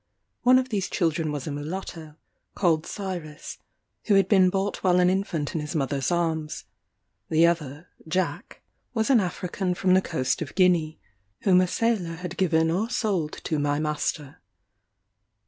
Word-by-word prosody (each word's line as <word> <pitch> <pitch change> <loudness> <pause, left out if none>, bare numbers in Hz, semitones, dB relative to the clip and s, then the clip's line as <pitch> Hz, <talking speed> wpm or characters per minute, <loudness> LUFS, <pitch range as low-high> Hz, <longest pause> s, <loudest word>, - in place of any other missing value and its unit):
One 255 +1 +6
of 260 0 0
these 200 -5 -2
children 160 -2 0
was 145 -3 -4
a 155 - -4
mulatto, 155 +1 -6 0.4
called 165 -4 +1
Cyrus, 175 -7 -6 0.5
who 205 - +3
had 195 -2 +4
been 190 -3 +5
bought 195 +2 -1
while 180 -1 +4
an 180 0 +4
infant 185 -6 -2
in 160 - -2
his 150 +3 -5
mother's 135 -2 0
arms; 165 -3 -1 0.7
the 160 +1 +4
other, 160 -1 -1 0.2
Jack, 185 +4 -3 0.3
was 220 +3 +1
an 250 - +6
African 180 0 -2
from 185 0 +2
the 185 - +5
coast 130 -7 -1
of 150 - -6
Guinea, 175 -4 +2 0.4
whom 185 -2 +5
a 185 - +2
sailor 195 -5 0
had 180 0 -6
given 160 -3 +2
or 205 +7 0
sold 190 -11 -1
to 155 - -1
my 145 0 +1
master. 150 -2 -3
175 Hz, 160 wpm, -25 LUFS, 155-190 Hz, 0.7 s, One